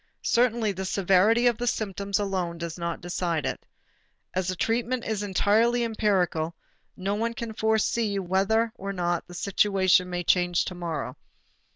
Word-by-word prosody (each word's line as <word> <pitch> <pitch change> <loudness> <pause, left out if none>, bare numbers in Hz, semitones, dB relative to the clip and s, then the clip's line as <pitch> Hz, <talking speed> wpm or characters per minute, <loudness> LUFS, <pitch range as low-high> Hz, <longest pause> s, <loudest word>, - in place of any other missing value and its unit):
Certainly 235 -3 +2
the 190 0 -5
severity 195 +5 +3
of 240 -2 +3
the 245 - -2
symptoms 200 -3 -1
alone 190 -4 -2
does 170 -1 -5
not 170 -1 -4
decide 175 -3 -2
it. - - -4 0.7
As 185 -1 -1
the 185 - -1
treatment 235 +5 -1
is 220 -2 -2
entirely 220 +4 +2
empirical, 185 -7 0 0.4
no 195 +2 -1
one 230 +2 -1
can 235 -2 -5
foresee 220 -1 +1
whether 195 +5 +1
or 195 +1 -4
not 175 -2 -1
the 175 - -11
situation 190 -1 +2
may 175 0 -3
change 175 0 +2
to - - -4
morrow. 165 -7 -4
195 Hz, 155 wpm, -26 LUFS, 175-220 Hz, 0.7 s, severity